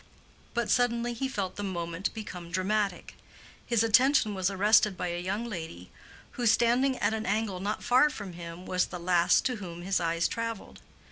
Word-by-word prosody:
But 235 -2 0
suddenly 240 0 +1
he 265 +3 -2
felt 200 -8 -4
the 205 - -4
moment 175 -1 -3
become 180 -6 -7
dramatic. 195 +2 -1 0.5
His 235 -2 +1
attention 235 0 +4
was 190 -1 0
arrested 205 0 +3
by 180 - -2
a 175 0 -3
young 200 +6 -2
lady 160 - -7 0.4
who, 240 -1 -1
standing 245 +4 +3
at 205 +2 +1
an 220 0 -3
angle 210 -2 -1
not 205 +3 -3
far 255 +5 +5
from 205 -10 -7
him, 170 +1 -9
was 185 0 0
the 180 - -7
last 175 0 +3
to 250 -2 0
whom 175 -4 -8
his 190 +1 +1
eyes 170 0 +1
traveled. 230 -2 -5
200 Hz, 180 wpm, -29 LUFS, 180-230 Hz, 0.5 s, far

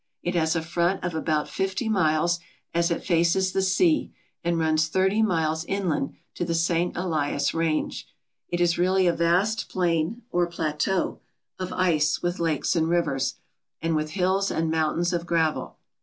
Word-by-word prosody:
It 175 - -1
has 160 -2 +1
a 165 - -1
front 170 +3 0
of 175 -1 -2
about 155 -1 0
fifty 195 +5 -2
miles 175 -4 +2 0.3
as 170 0 +2
it 170 - -2
faces 175 +2 +2
the 195 - 0
sea 185 -4 +2 0.3
and 170 0 +1
runs 160 -1 +2
thirty 190 +6 +2
miles 160 -6 +1
inland 180 -8 -1 0.2
to - - -3
the 170 -1 -1
St. 170 +1 0
Elias 150 -5 0
range. 165 -2 -1 0.4
It 175 - -2
is 175 -1 +2
really 185 +1 +3
a 175 - +4
vast 180 +7 +1
plain, 175 +5 0
or 175 0 +2
plateau, 165 +2 -1 0.4
of 185 -1 -4
ice 155 -4 +2
with 175 +1 -1
lakes 165 +1 0
and 165 -1 +1
rivers, 135 -6 0 0.4
and 165 -1 0
with 155 0 -2
hills 190 +1 +1
and 160 0 -1
mountains 160 +2 0
of 170 0 -2
gravel. 165 -3 0
170 Hz, 165 wpm, -25 LUFS, 160-185 Hz, 0.4 s, a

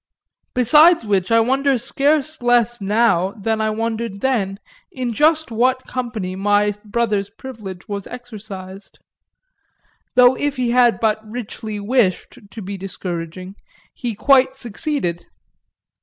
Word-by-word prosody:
Besides 300 +4 +5
which 195 -1 0
I 230 - +6
wonder 270 +3 +2
scarce 285 +4 0
less 240 -1 +2
now 200 -2 +2
than 220 0 -2
I 215 - +1
wondered 225 -2 -3
then 205 -8 0 0.3
in 250 -6 -3
just 310 +1 +2
what 255 +3 +1
company 220 -7 -4
my 205 +1 +2
brother's 210 -2 -1
privilege 210 -5 -9
was 200 -2 -5
exercised; 210 -5 -10 1.2
though 250 0 +7
if 290 +1 -2
he 250 -2 0
had 245 -1 +4
but 220 -1 +1
richly 220 -1 -6
wished 215 +1 0
to 220 - -9
be 195 +1 -5
discouraging 185 -1 -6 0.4
he 240 -4 -4
quite 265 +3 +4
succeeded. 235 - -3
225 Hz, 125 wpm, -20 LUFS, 200-255 Hz, 1.2 s, though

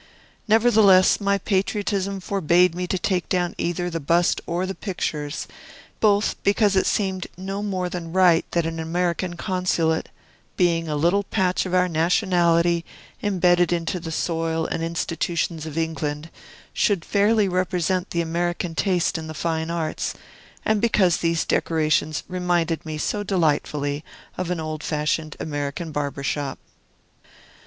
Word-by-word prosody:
Nevertheless, 215 -4 +5
my 200 0 +2
patriotism 195 0 -1
forbade 180 -2 +3
me 180 +1 -3
to 190 - 0
take 180 -1 -1
down 175 -1 0
either 175 +1 -1
the 165 -2 -3
bust, 170 +4 +2
or 175 +2 -1
the 190 - -3
pictures, 155 -7 -4 0.5
both 205 -1 +2
because 200 0 +3
it 190 - +3
seemed 190 -3 -1
no 195 +2 -4
more 190 -3 -2
than 175 -2 -6
right 180 -2 +5
that 170 -2 0
an 165 0 -3
American 175 +2 -1
Consulate 180 -4 0 0.5
(being 170 -2 +2
a 150 - -2
little 170 +7 +2
patch 190 -2 0
of 185 - -1
our 180 0 +4
nationality 170 0 +2 0.4
imbedded 180 -4 +3
into 170 +1 -1
the 165 -1 -6
soil 165 0 -1
and - - -3
institutions 165 -1 -2
of 155 0 -7
England) 160 -1 -3 0.4
should 195 -7 +1
fairly 205 +1 +3
represent 185 0 0
the 170 - 0
American 170 +1 -2
taste 175 -1 +1
in 160 - -7
the 155 - -7
fine 160 0 -2
arts, 165 -2 -2 0.5
and 215 -1 +2
because 195 -7 +3
these 165 -1 0
decorations 155 -1 +1
reminded 175 -3 0
me 155 -1 -4
so 205 +7 -1
delightfully 150 -6 0 0.3
of 185 -2 -3
an 180 -2 -1
old 155 -1 -4
fashioned 150 0 -1
American 145 +2 -4
barber's 145 -2 -3
shop. 140 -1 -2
175 Hz, 145 wpm, -23 LUFS, 160-185 Hz, 0.5 s, Nevertheless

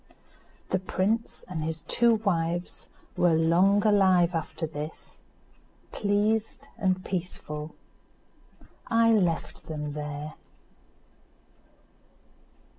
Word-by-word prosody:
The 190 - +1
prince 195 +5 -1
and 160 -4 -4
his 160 0 -4
two 235 -1 +3
wives 175 -5 -2 0.3
were 175 -2 +3
long 180 +6 +4
alive 185 -4 +4
after 165 0 -3
this, 155 0 -8 0.7
pleased 210 +2 0
and 185 -2 0
peaceful. 160 -4 -5 1.1
I 230 0 +4
left 180 -7 0
them 150 -2 -4
there. 150 0 -5
180 Hz, 85 wpm, -27 LUFS, 160-205 Hz, 1.1 s, long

